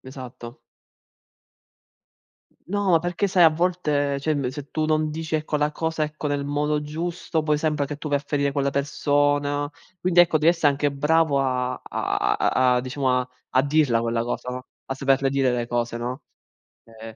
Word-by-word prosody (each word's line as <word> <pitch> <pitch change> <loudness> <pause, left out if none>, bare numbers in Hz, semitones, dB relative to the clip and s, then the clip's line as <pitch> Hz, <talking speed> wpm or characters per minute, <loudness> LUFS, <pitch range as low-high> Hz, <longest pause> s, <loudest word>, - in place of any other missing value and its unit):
esatto. 125 -2 -10 2.1
No, 195 -3 +2
perché 175 +4 -1
sai 180 -2 +5
a 165 - +9
volte 155 -4 0
cioè 155 +3 -1
emb 135 -3 -1
se 140 +2 -8
tu 155 0 0
non 155 0 +1
dici 160 0 -2
ecco 155 0 -2
la 150 0 +1
cosa, 160 0 -2
ecco, 150 0 -3
nel 145 -1 -1
modo 150 +1 0
giusto 160 +1 -3
poi 150 -1 +2
sembra 150 -2 0
che 145 - -5
tu 150 - -6
vai 145 -1 +2
a - - -9
ferire 140 -1 0
quella 140 -1 0
persona. 145 +1 0 0.3
Quindi 180 -1 +1
ecco 170 -2 +6
devi 155 +2 +4
esse 165 -3 +1
anche 145 0 +2
bravo 150 +1 +2
a 125 -1 -1
a 125 -1 +1
a 125 - +2
diciamo 130 0 0
a 125 - -5 0.2
a 130 - +3
dirla 145 -5 +2
quella 115 0 -1
cosa, 120 +1 -4
no, 125 +1 -6 0.2
a 135 - -3
saperle 135 0 +1
dire 135 -2 +2
le 120 -1 -2
cose, 120 -1 -1
no, 125 +4 -5 0.8
ehm 110 -1 -9
145 Hz, 180 wpm, -24 LUFS, 130-155 Hz, 2.1 s, a